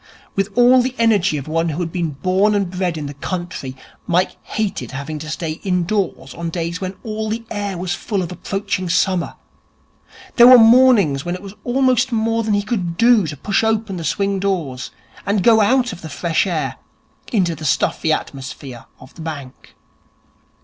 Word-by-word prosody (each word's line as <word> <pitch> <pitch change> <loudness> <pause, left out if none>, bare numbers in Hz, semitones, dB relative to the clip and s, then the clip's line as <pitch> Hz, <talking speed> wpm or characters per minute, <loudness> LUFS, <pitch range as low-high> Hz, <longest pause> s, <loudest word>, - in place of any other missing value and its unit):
With 195 +1 0
all 250 +1 +6
the 255 +1 -3
energy 205 -8 +2
of 140 - -6
one 165 +1 0
who 155 +2 -3
had 170 -2 -2
been 170 -2 -1
born 195 +3 +3
and 195 -3 0
bred 180 -3 -2
in 150 - -4
the 140 - -6
country, 175 -3 -5 0.3
Mike 180 +2 +1
hated 200 - -3
having 140 +3 -5
to 155 0 -7
stay 160 0 -4
indoors 180 -6 -1
on 170 0 -4
days 170 +1 -4
when 190 0 -4
all 220 -1 -3
the 230 +1 -3
air 205 -3 -3
was 175 0 -2
full 200 -2 -2
of 170 - -6
approaching 185 0 -3
summer. 180 0 +1 1.0
There 240 0 +9
were 255 0 +10
mornings 225 - +5
when 175 +1 -3
it 185 - -10
was 195 -1 -9
almost 255 0 +2
more 225 0 +1
than 215 -2 0
he 205 - 0
could 185 -6 -3
do 230 -6 +4
to 145 -1 -6
push 200 +9 0
open 220 -3 0
the 170 - -5
swing 195 +3 0
doors, 165 -10 -2 0.3
and 200 -2 0
go 225 0 +6
out 245 +1 +2
of 180 - -11
the 160 - -8
fresh 165 +5 0
air 150 -8 -2 0.5
into 185 -7 +1
the 160 - -9
stuffy 155 +2 +1
atmosphere 135 -4 -5
of 130 - -15
the - - -11
bank. 145 -5 -8
185 Hz, 185 wpm, -19 LUFS, 160-215 Hz, 1.0 s, were